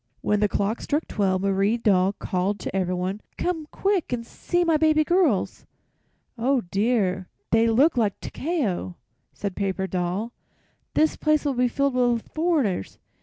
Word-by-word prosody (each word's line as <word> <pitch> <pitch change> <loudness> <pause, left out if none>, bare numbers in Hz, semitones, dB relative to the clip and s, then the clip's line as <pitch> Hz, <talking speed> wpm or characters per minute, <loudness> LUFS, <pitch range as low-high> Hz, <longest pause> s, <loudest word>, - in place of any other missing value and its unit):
When 210 - +1
the 210 0 +2
clock 205 +4 -1
struck 300 +3 -1
twelve 190 -2 0
Marie 200 +3 +2
Doll 195 -4 +3
called 190 +1 -2
to - - -5
everyone: 185 +2 -1 0.2
"Come 325 -4 -2
quick 390 -6 0
and 235 -2 -2
see 350 +8 -1
my 330 -2 +3
baby 310 0 +4
girls!" 340 - +1 0.7
"Oh, 260 +2 +2
dear! 195 -4 +1 0.2
they 225 +1 +4
look 260 +9 +4
just 250 - -2
like 210 -4 0
Takeo," 255 - -2 0.4
said 200 -3 -4
Paper 190 -1 -1
Doll. 185 +5 -2 0.6
"This 310 +1 +3
place 305 -1 +1
will 285 - +1
be 250 0 +2
filled 275 +2 0
with 245 -2 +2
foreigners. 310 - 0
225 Hz, 155 wpm, -24 LUFS, 195-300 Hz, 0.7 s, baby